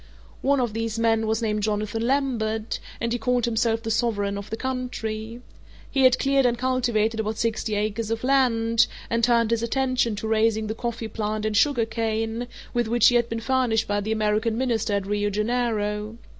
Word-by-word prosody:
One 280 +1 +2
of 240 -4 -1
these 225 0 -2
men 225 -1 +2
was 220 +1 0
named 210 -1 0
Jonathan 215 +1 -1
Lambert, 230 -5 -1 0.2
and 230 0 -1
he 240 - -1
called 245 +1 +1
himself 230 -1 0
the 225 - -2
sovereign 205 -3 0
of 200 +1 -7
the 220 - -4
country. 235 -3 -4 0.5
He 270 -2 +3
had 255 0 +6
cleared 275 0 +2
and 240 -1 0
cultivated 235 -3 0
about 215 0 -2
sixty 220 -1 -1
acres 215 +1 -2
of 225 +1 -2
land, 230 -4 +3 0.2
and 230 0 +1
turned 235 -1 +3
his 230 -1 +1
attention 255 -2 0
to 215 +2 -4
raising 220 0 +2
the 215 - -2
coffee 230 0 -4
plant 215 0 -3
and 215 -1 -1
sugar 240 0 +3
cane, 225 +1 -2 0.3
with 240 -2 +1
which 230 0 +5
he 245 - +1
had 235 -1 +2
been 230 0 -3
furnished 230 -2 +1
by 205 0 0
the 215 +2 -3
American 220 +1 +1
Minister 235 -4 0
at 200 -1 0
Rio 205 +1 0
Janeiro. 215 -1 -1
225 Hz, 190 wpm, -24 LUFS, 215-240 Hz, 0.5 s, had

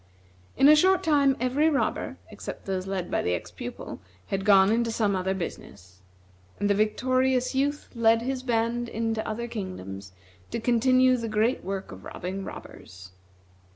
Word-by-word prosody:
In 275 - +6
a 305 - +9
short 375 +4 +4
time 285 -4 +3
every 265 +6 +2
robber, 285 -3 -1
except - - -8
those 190 -1 -3
led 190 -2 -3
by - - +1
the 90 - 0
ex 85 - -7
pupil, - - -7 0.3
had 195 0 -3
gone 195 -1 +6
into 230 0 +1
some 210 -3 +1
other 190 +1 -1
business; 95 - -8 0.6
and 205 - +1
the 200 - +3
victorious 255 +5 +1
youth 285 +2 -1
led 230 -1 +3
his 260 0 -2
band 235 -1 -1
into 225 0 -1
other 235 +2 -3
kingdoms 100 - -7 0.4
to - - -3
continue 255 +2 +3
the 230 -1 -4
great 220 +4 +1
work 195 +1 -5
of 95 0 -11
robbing 190 - -5
robbers. 90 - -11
225 Hz, 160 wpm, -26 LUFS, 190-255 Hz, 0.6 s, a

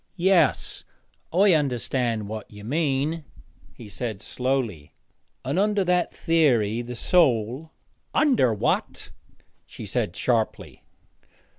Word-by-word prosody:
'Yes, 185 -1 +2 0.5
I 190 +2 +5
understand 125 -6 0
what 110 0 -7
you 105 -1 -12
mean,' 150 +4 -1 0.5
he 115 - -11
said 110 -1 -5
slowly, 120 - -3 0.5
'and 140 +7 0
under 205 0 +2
that 180 -1 +1
theory, 120 -10 +2
the 120 0 -7
soul 130 -1 +2 0.2
' - - -27
'Under 260 - +3
what?' 105 - -2 0.5
she - - -10
said - - -2
sharply. - - -1
130 Hz, 110 wpm, -24 LUFS, 115-165 Hz, 0.5 s, I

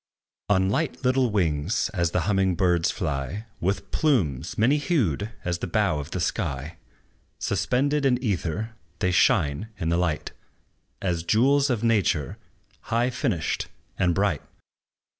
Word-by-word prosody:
On 95 -2 +3
light 140 +5 -1
little 130 -1 +3
wings, 85 -2 0
as 85 -3 +1
the 90 - 0
humming 95 0 +1
birds 90 -1 +2
fly, 80 - -3
With 95 +2 -2
plumes 95 - +1
many 125 +7 +4
hued 115 - 0 0.2
as 85 0 -1
the - - -3
bow 95 -4 +1
of 75 +1 -6
the 95 - -3
sky, 80 - -2 0.6
Suspended 140 +3 0
in 130 -2 +3
ether, 110 -2 -2 0.2
they 95 -3 +1
shine 90 - +2
in 80 -3 -2
the 85 - +2
light, 85 -4 -1 0.7
As 90 -3 0
jewels 135 - +3
of 120 -3 0
nature, 100 -10 +1 0.5
high 120 +2 +1
finished 115 - -1 0.3
and 90 -1 +2
bright. 95 -7 +1
95 Hz, 140 wpm, -25 LUFS, 85-115 Hz, 0.7 s, many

